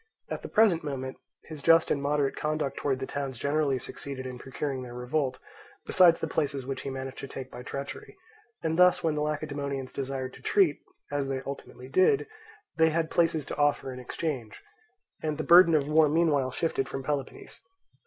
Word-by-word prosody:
At - - -4
the - - -6
present 210 -7 +4
moment 130 -3 -4 0.3
his 155 -2 -9
just 165 +2 +5
and 140 - +1
moderate 145 -1 +1
conduct 155 -2 -2
towards 135 -2 0
the 135 - -3
towns 135 -2 -4
generally 140 +1 +1
succeeded 130 +1 -6
in 125 -1 -6
procuring 135 +1 -4
their 120 -1 -8
revolt, 130 +2 -1 0.5
besides 175 -3 +5
the - - -2
places 140 -4 -1
which 135 0 -4
he - - -4
managed 135 0 -6
to 135 - -6
take 130 -1 -8
by 125 - -8
treachery; 140 - -7 0.5
and 160 +1 0
thus 180 0 +5
when 160 -2 +2
the 150 - -1
Lacedaemonians 145 -3 -3
desired 135 -1 -4
to - - -13
treat, 185 -8 +3 0.3
as 145 -1 -1
they 135 -1 -3
ultimately 135 -2 -8
did, 185 - +3 0.5
they 160 0 +5
had 160 0 -1
places 165 -4 +2
to - - -6
offer 145 -2 +1
in 125 - -8
exchange, 125 -3 -4 0.6
and 155 -2 -2
the 155 - -2
burden 170 0 +7
of 145 -2 +2
war 155 0 +5
meanwhile 150 -4 +2
shifted 135 -2 -1
from 135 - -5
Peloponnese. 140 0 -4
140 Hz, 185 wpm, -28 LUFS, 135-155 Hz, 0.6 s, burden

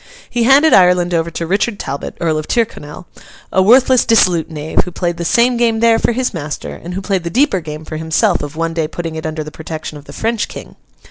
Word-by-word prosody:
He 240 -1 -1
handed 285 +5 +5
Ireland 180 -1 +4
over 165 0 0
to 170 0 -4
Richard 200 +5 0
Talbot, 140 -6 -6
Earl 160 -2 0
of 155 - -7
Tyrconnell, 185 -9 -3 0.5
a 190 - +4
worthless, 255 +4 +5
dissolute 180 -8 +3
knave, 155 0 -1
who - - -7
played 175 0 -2
the 170 - -4
same 240 +7 +2
game 230 -2 +1
there 230 0 +4
for - - +1
his 255 0 -1
master, 150 -4 -5
and 175 +1 -8
who 195 - -3
played 190 -2 -1
the 170 - -3
deeper 250 - +2
game 155 0 -8
for 155 - -6
himself 160 +5 +1
of 145 +1 -6
one 165 0 -2
day 165 -2 -1
putting 165 0 -5
it 160 0 -4
under 155 0 -4
the 155 - -9
protection 155 -1 -7
of 145 - -17
the 140 - -11
French 225 +3 -1
King. - - -10
175 Hz, 230 wpm, -16 LUFS, 160-225 Hz, 0.5 s, handed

